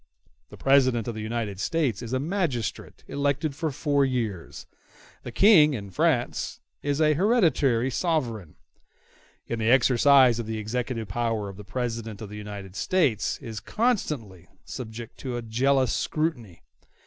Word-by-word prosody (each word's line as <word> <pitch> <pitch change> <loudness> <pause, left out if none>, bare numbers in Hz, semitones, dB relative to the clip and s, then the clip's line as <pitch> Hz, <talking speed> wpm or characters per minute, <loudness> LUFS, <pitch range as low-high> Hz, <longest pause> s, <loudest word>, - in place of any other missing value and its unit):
The - - -12
President 130 -4 +3
of 120 - -2
the 110 - -6
United 110 -3 -3
States 135 -6 0
is 120 -2 -7
a 130 - 0
magistrate 150 - -3
elected 140 +1 -1
for 155 +3 -2
four 145 0 +1
years; 115 -9 -3 0.6
the - - -8
King, 160 -9 +6
in 100 -4 -7
France, 150 - 0 0.2
is 145 0 -1
an 155 -1 +4
hereditary 150 - +2
sovereign. 120 - -2 0.9
In 115 - -4
the 110 0 +1
exercise 130 0 +5
of 115 - -4
the 110 0 -3
executive 115 +1 -3
power 110 -1 -2
the 105 +2 -11
President 115 -1 -4
of 110 - -8
the 105 - -9
United 100 -3 -8
States 145 - +1
is 110 -2 -6
constantly 140 - -2 0.2
subject 115 -1 -8
to 125 -3 -4
a 120 - -5
jealous 130 +3 +1
scrutiny. 120 - -2
120 Hz, 145 wpm, -26 LUFS, 110-145 Hz, 0.9 s, King